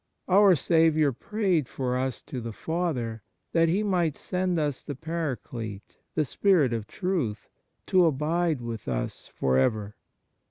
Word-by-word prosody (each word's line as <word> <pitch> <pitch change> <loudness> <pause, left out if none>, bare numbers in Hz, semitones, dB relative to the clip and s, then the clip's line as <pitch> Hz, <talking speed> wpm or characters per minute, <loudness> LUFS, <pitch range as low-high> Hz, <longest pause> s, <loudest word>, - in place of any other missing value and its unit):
Our 195 0 +6
Saviour 160 -2 +3
prayed 185 - 0
for 125 -2 -2
us 130 -1 -2
to 125 - -6
the 115 -1 -5
Father 130 -9 -2 0.3
that 165 -1 +3
He 195 +6 +1
might 175 -7 +1
send 180 -1 -1
us 145 -4 -1
the 145 - -6
Paraclete, 130 -9 -5 0.2
the 155 - +2
Spirit 155 -4 +3
of 110 -2 -3
Truth, 165 - -2 0.4
to 185 -2 +4
abide 160 0 +1
with 115 -2 -6
us - - -3
for 65 -1 +1
ever. 105 - 0
150 Hz, 145 wpm, -27 LUFS, 115-175 Hz, 0.4 s, Our